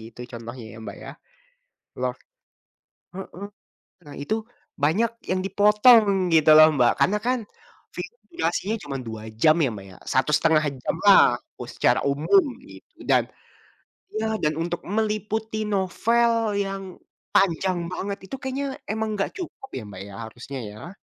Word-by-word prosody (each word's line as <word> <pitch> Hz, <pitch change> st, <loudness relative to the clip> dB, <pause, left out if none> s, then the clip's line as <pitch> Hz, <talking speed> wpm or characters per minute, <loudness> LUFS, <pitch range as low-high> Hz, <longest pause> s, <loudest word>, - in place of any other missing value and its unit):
gitu 115 Hz, +2 st, -13 dB
contohnya 115 Hz, +1 st, -8 dB
ya 110 Hz, -, -11 dB
Mbak -, -, -7 dB
ya. -, -, -7 dB, 0.9 s
Loh -, -, 0 dB, 1.1 s
mhm. 195 Hz, +1 st, -8 dB, 0.6 s
Nah -, -, -10 dB
itu, 215 Hz, -, -1 dB, 0.5 s
banyak 200 Hz, +11 st, +2 dB, 0.2 s
yang 185 Hz, 0 st, +1 dB
dipotong 205 Hz, -1 st, +5 dB
gitu 160 Hz, -1 st, +4 dB
loh 155 Hz, 0 st, +10 dB
Mbak, 120 Hz, -3 st, +4 dB
karena 210 Hz, +3 st, +3 dB
kan, 255 Hz, +1 st, +2 dB, 0.6 s
film 475 Hz, -, -6 dB, 0.2 s
durasinya 225 Hz, -, -1 dB
cuma 140 Hz, -1 st, -5 dB
2 110 Hz, -1 st, -6 dB, 0.2 s
jam 155 Hz, 0 st, +6 dB
ya -, -, +2 dB
Mbak 95 Hz, -1 st, -9 dB
ya, -, -, -14 dB, 0.2 s
1,5 155 Hz, +3 st, +3 dB, 0.2 s
jam -, -, -2 dB
lah, -, -, +9 dB, 0.2 s
kalo -, -, -12 dB
secara -, -, +2 dB
umum, 160 Hz, -, +4 dB, 0.2 s
gitu. -, -, -15 dB
Dan -, -, +2 dB, 0.9 s
ya, 220 Hz, -, 0 dB
dan 150 Hz, -, +1 dB
untuk 170 Hz, +1 st, -2 dB, 0.2 s
meliputi 215 Hz, 0 st, -2 dB
novel 230 Hz, +5 st, +2 dB, 0.3 s
yang 195 Hz, 0 st, -5 dB, 0.5 s
panjang 185 Hz, 0 st, +2 dB
banget 200 Hz, +2 st, -4 dB
itu 270 Hz, -, -6 dB
kayaknya 270 Hz, +1 st, -3 dB, 0.2 s
emang 220 Hz, +1 st, -1 dB
enggak 195 Hz, -, -1 dB
cukup 325 Hz, -7 st, -8 dB
ya 130 Hz, -, -4 dB
Mbak 100 Hz, -2 st, -9 dB
ya, 100 Hz, -, -11 dB
harusnya 120 Hz, +4 st, -8 dB
ya. 165 Hz, -, -11 dB
190 Hz, 145 wpm, -24 LUFS, 145-220 Hz, 1.1 s, loh